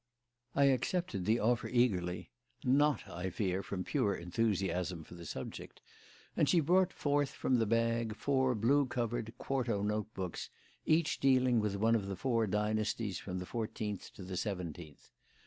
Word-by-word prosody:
I 140 - +4
accepted 135 - +1
the 110 +2 +3
offer 115 +2 +1
eagerly 90 -8 +1 0.3
(not, 140 0 +3
I 90 +2 -4
fear, 95 0 -1
from 95 -2 -4
pure 105 -7 +1
enthusiasm 90 -2 -1
for - - -13
the 85 -2 -9
subject), - - -7 0.6
and 150 - +3
she 175 - +5
brought 180 +4 +3
forth 145 -1 +1
from 125 -2 +1
the 115 - +2
bag 115 0 +1
four 130 -2 +1
blue 135 +6 +3
covered, 120 -2 -2
quarto 120 -7 -1
note 105 +1 -1
books, 95 -3 -4 0.4
each 160 0 +2
dealing 130 -3 +4
with 105 -2 0
one 110 +3 +3
of 105 -4 +1
the 100 - -3
four 115 -1 +1
dynasties 105 0 -1
from 95 -2 -5
the 90 - -4
fourteenth 110 -2 -4
to 95 - -9
the 90 0 -5
seventeenth. 85 - -5
110 Hz, 160 wpm, -34 LUFS, 95-130 Hz, 0.6 s, she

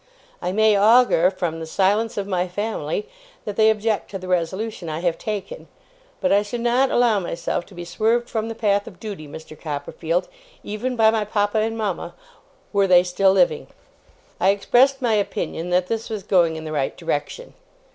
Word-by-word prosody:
I 180 - -2
may 215 +1 +4
augur, 210 -4 +5
from 175 -4 -3
the 160 - -6
silence 205 +7 +1
of 200 - -1
my 185 -2 -1
family, 225 - -3 0.4
that 210 - -4
they 220 0 +5
object 220 0 0
to 195 - -5
the 185 -1 -9
resolution 185 +2 -2
I 155 +1 -4
have 175 -2 -1
taken; 215 - -5 0.5
but 275 - +1
I 200 - +5
should 220 +3 -5
not 245 +3 +2
allow 235 -4 +3
myself 170 -1 -3
to - - -15
be 175 0 -7
swerved 230 +6 0
from 225 0 -3
the 225 - -5
path 205 -3 +1
of 180 - -12
duty, 200 -9 -7
Mr. 155 +1 -10
Copperfield, 160 +3 -3 0.4
even 230 +5 -3
by 220 -1 +5
my 220 -1 0
papa 205 0 0
and 225 +1 -1
mama, 205 -5 -3 0.6
were 200 -1 +3
they 180 -1 +6
still 190 +2 +2
living.' 180 -5 +2 0.7
I 190 - +3
expressed 250 +7 +3
my 235 -2 +2
opinion 195 -4 -2
that 180 0 +2
this 225 +4 -3
was 215 -3 -4
going 175 -4 +2
in 160 - -6
the 155 - -5
right 140 -3 -2
direction. 165 - -4
200 Hz, 185 wpm, -22 LUFS, 175-220 Hz, 0.7 s, they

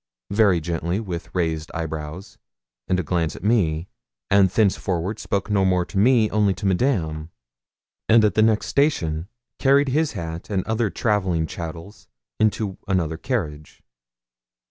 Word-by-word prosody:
very 100 -4 +4
gently, 85 +3 -2
with 90 -6 -5
raised 80 -3 -1
eyebrows, 80 +2 -6 0.5
and 90 - +1
a - - -1
glance 80 0 -1
at - - -11
me, 90 -7 +1 0.4
and 100 -1 +5
thenceforward 95 -1 0
spoke 100 0 -2
no 100 -2 +3
more 90 -2 +2
to 95 - -3
me, 115 0 +4
only 105 -3 +2
to 105 - -7
Madame, 90 - 0 0.8
and 110 -1 +6
at 105 - +2
the 110 - +3
next 110 -1 +3
station 85 - 0 0.3
carried 140 +1 +4
his 155 +3 +1
hat 80 +2 -6
and 95 -3 0
other 110 -1 0
travelling 95 -7 0
chattels 85 +5 -8 0.3
into 105 -2 0
another 85 -5 0
carriage. 80 - -4
95 Hz, 145 wpm, -23 LUFS, 80-110 Hz, 0.8 s, and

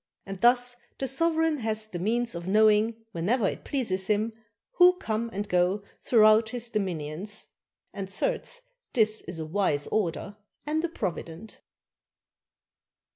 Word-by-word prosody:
And 195 -1 -7
thus 245 +2 +4 0.2
the 270 - -2
sovereign 320 +2 +1
hath 220 -1 -1
the 175 - -4
means 235 +5 0
of 170 +1 -6
knowing, 215 +2 +3
whenever 200 +5 +1
it - - -4
pleases 190 -9 -2
him, 215 +2 +1 0.4
who 360 0 +8
come 230 - -2
and 205 0 -4
go 180 +2 +1 0.2
throughout 220 -1 +5
his 240 0 -4
dominions. 190 0 -3 0.5
And 195 -1 -5
certes - - -2 0.3
this 215 -3 +2
is 170 0 -8
a 160 - -4
wise 155 -4 0
order 200 0 -2 0.3
and 310 +2 -1
a 340 - 0
provident. 190 - -6
215 Hz, 135 wpm, -27 LUFS, 190-240 Hz, 0.5 s, who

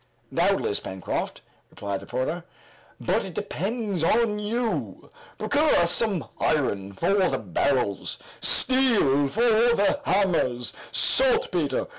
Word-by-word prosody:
"Doubtless, - - +1
Pencroft," 95 -1 -5 0.3
replied 100 -1 -5
the 100 - -13
reporter, 155 +7 -3 0.6
"but - - 0
it - - -8
depends 200 -2 -3
on 215 +3 +2
you. 225 +2 -3 0.3
Procure 295 +1 +2
us 170 0 +3
some 205 -6 0
iron 100 -10 0
for 100 - 0 0.2
the - - -1
barrels, 110 - -1 0.2
steel 225 - +3
for 210 +12 -3 0.3
the 205 - +1
hammers, 165 - 0 0.2
saltpeter. 185 - +2
175 Hz, 110 wpm, -25 LUFS, -, 0.6 s, us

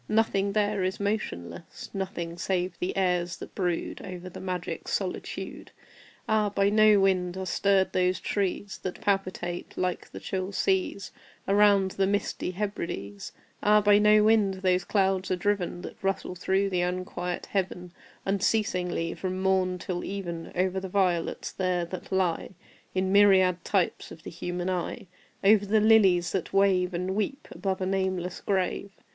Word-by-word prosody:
Nothing 200 -2 +2
there 205 -2 +1
is 185 +2 -2
motionless 145 - -4
Nothing 185 -4 -4
save 180 0 -1
the 180 - -2
airs 180 -2 +1
that - - -10
brood 175 -3 -2
Over 185 -1 -7
the - - -9
magic 180 -2 -4
solitude. - - -4 0.6
Ah, 215 -1 +2
by 200 0 +2
no 215 -1 +6
wind 185 -2 +1
are 190 - -3
stirred 195 +1 +2
those 180 0 +2
trees 200 0 -2
That 185 - -5
palpitate 185 -3 -2
like 180 -1 -2
the - - -8
chill 190 +1 -3
seas 190 0 0 0.4
Around 200 -1 +4
the 195 0 +1
misty 200 -2 -1
Hebrides! 170 - -4 0.3
Ah, 210 0 +5
by 205 0 +5
no 210 0 +6
wind 210 -3 +4
those 185 -1 +3
clouds 190 -2 +1
are 185 - +2
driven 180 -2 -1
That - - -9
rustle 195 -1 -1
through 190 +2 0
the 180 -1 +1
unquiet 180 0 -3
Heaven 180 -2 -3 0.3
Unceasingly, 185 -4 0
from 185 0 -4
morn 190 -1 +1
till 175 0 -4
even, 175 -4 -5
Over 185 +1 +1
the 190 0 -6
violets 180 -3 0
there 180 -2 0
that 175 +1 -8
lie 185 -1 0 0.4
In 190 0 +1
myriad 190 -3 +5
types 190 -4 0
of 160 - -11
the - - -7
human 175 +1 -4
eye 185 -2 -3 0.4
Over 205 0 +5
the 215 +2 +4
lilies 195 -6 +5
that 190 - -2
wave 190 -2 +3
And 180 +2 -2
weep 215 +7 -2
above 190 -2 -3
a - - 0
nameless 185 -2 -1
grave! 195 0 -1
190 Hz, 155 wpm, -27 LUFS, 180-200 Hz, 0.6 s, no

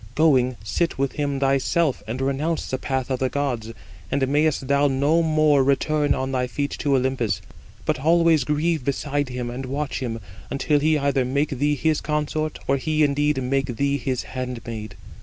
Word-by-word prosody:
Going, 130 -5 +3
sit 110 - -1
with 135 0 0
him 140 -2 -2
thyself, 135 +2 +1
and 115 +4 -4
renounce 145 +5 -1
the 130 - -1
path 130 -1 -2
of 130 - 0
the 130 - +1
gods. 125 -6 -2 0.4
And 135 -1 +1
mayest 145 -1 +1
thou 140 +1 +3
no 145 +5 +2
more 155 -3 +3
return 145 +2 +2
on 130 0 -2
thy 125 -1 0
feet 140 +4 -2
to 140 -2 +2
Olympus: 125 -7 0 0.5
but - - 0
always 165 0 +4
grieve 150 +2 0
beside 145 +1 -1
him, 125 -1 -4
and 130 +2 -5
watch 145 +2 -3
him, 115 -3 -3 0.3
until 145 +2 +1
he 155 +1 +3
either 140 -2 +1
make 140 +4 0
thee 145 +2 0
his 155 +2 +1
consort, 150 0 -2
or 135 - +3
he 155 +3 +1
indeed 145 -1 +1
[make 135 -1 -1
thee] 140 +3 +1
his 130 0 -2
handmaid. 115 -5 -6
140 Hz, 175 wpm, -23 LUFS, 130-150 Hz, 0.5 s, always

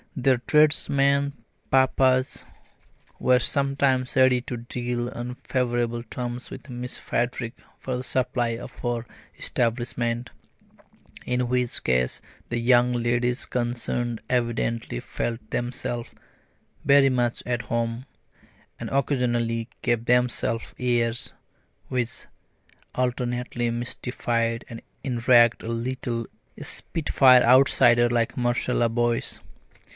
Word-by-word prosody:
Their 130 -2 +2
tradesmen 140 -1 +3 0.4
papas 130 0 +2 0.8
were 125 0 +4
sometimes 135 -1 +1
ready 130 -1 +5
to 125 0 -5
deal 120 0 -3
on 120 +1 -6
favourable 120 -2 -1
terms 120 +1 -5
with 135 +1 -10
Miss 125 0 -5
Frederick 120 -1 -2 0.2
for 130 - -4
the 125 - -5
supply 125 -2 0
of - - -10
her 120 -1 -2 0.3
establishment; 120 0 -1 0.9
in 125 0 0
which 125 -1 0
case 65 -1 +1 0.3
the 120 - -1
young 120 +1 +4
ladies 120 +1 0
concerned 120 -1 -2
evidently 115 - -1
felt 115 - -4
themselves 120 -1 -3 0.7
very 140 -1 +6
much 120 -2 0
at 120 -1 -1
home, 115 +2 -2 0.7
and - - -5
occasionally 120 -4 0
gave 120 -1 0
themselves 125 -2 +1
airs 120 -1 +1 0.6
which 125 -2 -2 0.7
alternately 125 -1 -1
mystified 115 -1 -2
and 115 -1 -9 0.2
enraged 120 -2 +4
a 115 - -5
little 115 0 -2 0.3
spitfire 130 -5 +3
outsider 120 -1 +5
like 120 -1 0
Marcella 120 -1 +1
Boyce. 120 0 0
120 Hz, 100 wpm, -25 LUFS, 120-125 Hz, 0.9 s, very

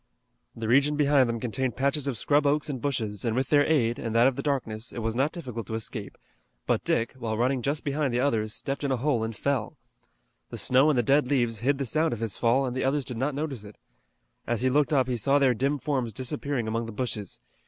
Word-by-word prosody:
The 115 -1 -4
region 140 +5 +4
behind 145 -4 +3
them 115 0 -2
contained 125 +1 -2
patches 140 +2 0
of 130 -4 -1
scrub 145 +4 +2
oaks 150 +1 +1
and 130 -4 -5
bushes, 110 -8 -2
and 115 -2 0
with 130 0 0
their 145 -1 +5
aid 120 -7 +1
and 115 -1 -4
that 115 +1 +5
of 135 -1 +3
the - - -3
darkness, 120 -6 -2
it - - -10
was 115 0 -1
not 135 +5 +1
difficult 125 -10 -6
to 110 - -3
escape; 110 -2 -5 0.5
but - - 0
Dick, 115 +1 0
while 110 -2 -2
running 125 +2 +1
just 145 +4 -1
behind 145 -2 -1
the 120 - 0
others, 115 -5 0
stepped 135 +6 -4
in 140 - 0
a 130 - +1
hole 125 -3 0
and 110 0 -4
fell. 135 -4 -2 0.7
The - - -7
snow 130 +4 +4
and 145 - +2
the 120 - +3
dead 140 +3 +3
leaves 120 -5 0
hid 135 +4 +1
the 135 - -2
sound 155 +5 +1
of 115 - -5
his 115 -3 -2
fall 125 +3 +2
and 125 -1 -3
the 130 - -1
others 135 +1 0
did 125 - -4
not 135 +3 -1
notice 140 -7 -4
it. 105 0 -12 0.7
As 120 0 -1
he 130 - +3
looked 150 +3 +2
up 130 -4 +3
he 125 -2 -1
saw 140 +5 +3
their 135 -3 +4
dim 135 +5 0
forms 130 -5 -2
disappearing 130 0 -2
among 115 +1 -2
the - - -6
bushes. 105 -4 -4
130 Hz, 245 wpm, -27 LUFS, 115-140 Hz, 0.7 s, their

